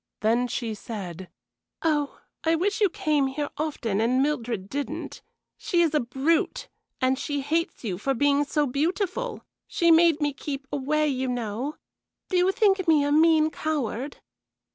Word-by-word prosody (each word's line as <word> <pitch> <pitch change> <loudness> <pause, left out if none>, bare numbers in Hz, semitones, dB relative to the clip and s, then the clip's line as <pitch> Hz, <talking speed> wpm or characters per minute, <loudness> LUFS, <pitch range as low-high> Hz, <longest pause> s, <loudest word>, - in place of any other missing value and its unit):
Then 230 +3 +2
she 230 -2 -3
said: 190 -5 -7 0.5
"Oh, 295 -3 0 0.2
I 325 0 +3
wish 400 +6 0
you 410 - +5
came 300 -4 +1
here 285 +2 -3
often 245 -9 -1
and 255 +4 +3
Mildred 240 -9 -2
didn't. 280 +5 -5 0.4
She 345 -4 +2
is 320 -2 +1
a 300 - +3
brute, 270 +7 0 0.3
and 260 0 +1
she 290 -1 -2
hates 325 +3 -1
you 190 -6 -3
for 270 +5 0
being 285 +2 +3
so 295 +1 0
beautiful. 370 - -2 0.2
She 340 -1 +3
made 330 -1 +5
me 290 -1 0
keep 275 0 -5
away, 300 +2 +1
you 260 -2 -1
know. 245 +4 -3 0.5
Do 370 - +1
you 360 +1 +4
think 390 -3 +2
me 310 -3 +5
a 290 - 0
mean 315 0 +5
coward?" 285 -4 -3
290 Hz, 160 wpm, -26 LUFS, 250-320 Hz, 0.5 s, you